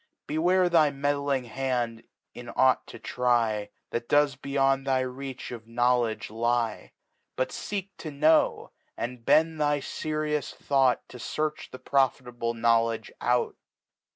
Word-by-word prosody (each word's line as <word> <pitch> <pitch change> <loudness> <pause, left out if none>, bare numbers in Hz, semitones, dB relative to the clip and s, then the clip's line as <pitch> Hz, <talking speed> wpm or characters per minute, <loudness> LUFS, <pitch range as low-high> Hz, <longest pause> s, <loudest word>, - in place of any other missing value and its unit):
.Beware 180 +4 +2
thy 165 -4 +4
meddling 140 -1 0
Hand 120 -1 -2 0.3
in 120 0 -9
ought 130 -1 +3
to - - -9
try. 115 -4 0 0.2
That 120 0 -3
does 145 -2 +4
beyond 135 0 0
thy 130 -1 +2
reach 130 +1 -6
of 115 -2 -8
Knowledge 120 -2 +1
lie; 115 0 -1 0.4
But 130 - 0
feek 200 -2 -4
to 155 - -5
kno^, 155 +2 +2 0.3
andbetui 140 +7 +1
thy 145 -1 +2
ferious 150 +1 -3
Thought 135 -3 +2
To 125 - -10
fearch 155 +4 -3
the - - -9
profitable 125 -4 0
Knowledge 115 -1 +1
out. 120 0 +1
130 Hz, 125 wpm, -27 LUFS, 120-145 Hz, 0.4 s, thy